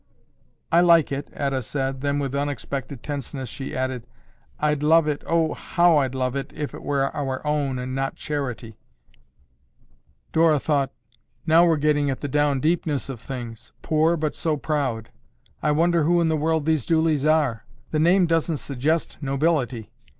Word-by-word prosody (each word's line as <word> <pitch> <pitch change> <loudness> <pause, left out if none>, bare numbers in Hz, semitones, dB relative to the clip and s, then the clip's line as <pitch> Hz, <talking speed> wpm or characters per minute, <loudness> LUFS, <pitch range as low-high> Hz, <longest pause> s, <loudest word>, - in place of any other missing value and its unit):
"I 170 - +5
like 170 -4 +5
it," 140 +1 -4
Etta 135 -2 -2
said, 135 +1 -3
then 140 0 0
with 140 -2 -2
unexpected 140 -2 -4
tenseness 135 -3 -5
she 135 +2 -6
added, 130 -2 -3 0.5
"I'd 150 -1 +1
love 160 +1 +4
it, 150 -1 -2
oh, 165 -1 +2
how 170 -2 +3
I'd 135 -2 -1
love 130 0 -1
it, 140 - -4
if 150 -1 -4
it - - -8
were 140 -1 -1
our 135 -1 -3
own 145 -3 0
and 125 +1 -4
not 135 0 -2
charity." 125 -7 -5 1.5
Dora 160 -1 +4
thought, 140 -2 0 0.5
"Now 165 +2 +5
we're 165 -2 +3
getting 145 -1 +2
at 135 - -2
the 145 - -2
down 145 0 +1
deepness 155 -2 0
of 130 -4 -6
things. 120 -4 -8
Poor, 160 +2 +2
but 155 -1 -1
so 155 -2 -1
proud! 135 -7 -2 0.5
I 150 - +1
wonder 170 +2 +2
who 175 +3 +3
in 165 -1 +2
the 160 - +2
world 160 0 0
these 155 -5 +1
Dooleys 160 -3 +2
are. 145 -8 +2 0.3
The 155 - 0
name 175 +4 +4
doesn't 165 -1 0
suggest 145 +4 -2
nobility." 135 -5 -1
145 Hz, 165 wpm, -24 LUFS, 135-160 Hz, 1.5 s, I